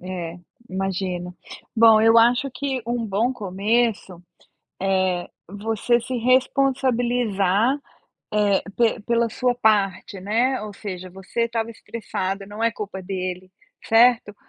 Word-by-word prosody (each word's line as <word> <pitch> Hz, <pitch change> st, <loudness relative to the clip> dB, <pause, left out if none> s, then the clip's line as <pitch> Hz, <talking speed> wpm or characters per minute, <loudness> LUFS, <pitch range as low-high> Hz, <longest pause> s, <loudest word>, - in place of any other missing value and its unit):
É, 180 Hz, -2 st, -6 dB, 0.3 s
imagino. 185 Hz, -2 st, -3 dB, 0.4 s
Bom, 225 Hz, -1 st, +7 dB
eu 225 Hz, +1 st, +5 dB
acho 245 Hz, +4 st, +4 dB
que 265 Hz, -1 st, -3 dB
um 240 Hz, 0 st, -1 dB
bom 220 Hz, +4 st, 0 dB
começo, 205 Hz, -2 st, -1 dB, 0.6 s
é 190 Hz, -2 st, 0 dB, 0.2 s
você 220 Hz, +5 st, 0 dB
se 255 Hz, +2 st, -4 dB
responsabilizar, 245 Hz, -3 st, +2 dB, 0.6 s
eh, 205 Hz, -2 st, +2 dB
pe 235 Hz, -1 st, +2 dB
pela 235 Hz, +1 st, +1 dB
sua 250 Hz, +2 st, 0 dB
parte, 200 Hz, -4 st, +1 dB
né, 235 Hz, +7 st, +1 dB
ou 210 Hz, -1 st, -7 dB
seja, 185 Hz, -3 st, -7 dB
você 190 Hz, +5 st, -5 dB
estava 230 Hz, -1 st, -2 dB
estressado, 195 Hz, -4 st, -5 dB
não 210 Hz, +2 st, -5 dB
é 230 Hz, -, +3 dB
culpa 200 Hz, -2 st, -6 dB
dele, 185 Hz, -1 st, -5 dB, 0.3 s
certo? 225 Hz, -2 st, +4 dB
215 Hz, 120 wpm, -23 LUFS, 190-235 Hz, 0.6 s, Bom